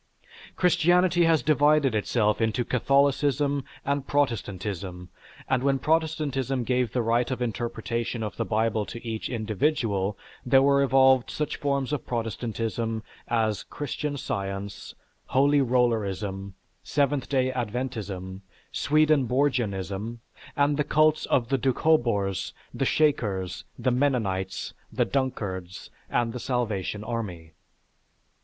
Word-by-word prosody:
Christianity 175 Hz, 0 st, +4 dB
has 165 Hz, -2 st, +3 dB
divided 150 Hz, -2 st, +4 dB
itself 105 Hz, +1 st, +1 dB
into 115 Hz, +2 st, +1 dB
Catholicism 140 Hz, +2 st, +2 dB, 0.2 s
and 140 Hz, -1 st, -1 dB
Protestantism; 100 Hz, -9 st, -2 dB, 0.4 s
and 130 Hz, -2 st, +1 dB
when 135 Hz, 0 st, +2 dB
Protestantism 145 Hz, -4 st, 0 dB
gave 125 Hz, -1 st, 0 dB
the 125 Hz, -, 0 dB
right 120 Hz, +2 st, +1 dB
of 130 Hz, -2 st, -2 dB
interpretation 115 Hz, 0 st, -3 dB
of 105 Hz, -, -4 dB
the -, -, -1 dB
Bible 110 Hz, 0 st, 0 dB
to 115 Hz, +3 st, -8 dB
each 110 Hz, -1 st, -3 dB
individual, 110 Hz, -3 st, 0 dB, 0.3 s
there 135 Hz, +1 st, +5 dB
were 140 Hz, 0 st, +4 dB
evolved 130 Hz, -2 st, +4 dB
such 150 Hz, -, -3 dB
forms 140 Hz, -1 st, -1 dB
of 150 Hz, -, -3 dB
Protestantism 115 Hz, -1 st, -2 dB, 0.2 s
as 110 Hz, -4 st, +1 dB
Christian 145 Hz, 0 st, -4 dB
Science, 100 Hz, -4 st, -5 dB, 0.3 s
Holy 140 Hz, +2 st, +4 dB
Rollerism, 105 Hz, -6 st, 0 dB, 0.3 s
Seventh 145 Hz, -1 st, 0 dB
Day 130 Hz, -2 st, +2 dB
Adventism, 105 Hz, -6 st, -4 dB, 0.3 s
Swedenborgianism, 125 Hz, -, +1 dB, 0.4 s
and 145 Hz, 0 st, +2 dB
the 150 Hz, -, +2 dB
cults 155 Hz, +1 st, +2 dB
of 120 Hz, -3 st, +1 dB
the 135 Hz, -, +1 dB
Doukhobors, 120 Hz, -, +1 dB, 0.2 s
the -, -, -1 dB
Shakers, 105 Hz, -12 st, 0 dB
the 130 Hz, -, +1 dB
Mennonites, 110 Hz, -9 st, -1 dB, 0.2 s
the -, -, +1 dB
Dunkards 95 Hz, -9 st, -3 dB, 0.2 s
and 115 Hz, -1 st, 0 dB
the 125 Hz, -, -5 dB
Salvation 110 Hz, -5 st, -2 dB
Army. 100 Hz, -9 st, -5 dB
125 Hz, 115 wpm, -26 LUFS, 105-140 Hz, 0.4 s, there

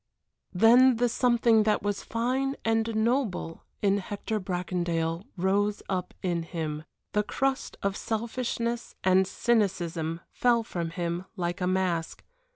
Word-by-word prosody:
Then 240 Hz, +6 st, +6 dB
the 245 Hz, +2 st, +2 dB
something 235 Hz, -2 st, +3 dB
that 215 Hz, 0 st, +1 dB
was 205 Hz, -1 st, -1 dB
fine 260 Hz, +4 st, -1 dB
and 225 Hz, 0 st, +1 dB
noble 220 Hz, -7 st, 0 dB, 0.2 s
in 200 Hz, 0 st, +3 dB
Hector 205 Hz, +2 st, -3 dB
Bracondale 175 Hz, -2 st, -2 dB
rose 200 Hz, +3 st, +1 dB
up 185 Hz, -2 st, -2 dB
in 175 Hz, -2 st, 0 dB
him 160 Hz, -2 st, -4 dB, 0.3 s
the 210 Hz, -, +3 dB
crust 265 Hz, +5 st, -2 dB
of 200 Hz, -1 st, 0 dB
selfishness 235 Hz, +1 st, -3 dB
and 185 Hz, 0 st, +4 dB
cynicism 175 Hz, -8 st, 0 dB
fell 240 Hz, -2 st, +2 dB
from 170 Hz, -6 st, -4 dB
him 170 Hz, +1 st, -3 dB
like 175 Hz, -1 st, -3 dB
a 180 Hz, -, +1 dB
mask. 185 Hz, -3 st, -1 dB
200 Hz, 130 wpm, -28 LUFS, 175-230 Hz, 0.3 s, Then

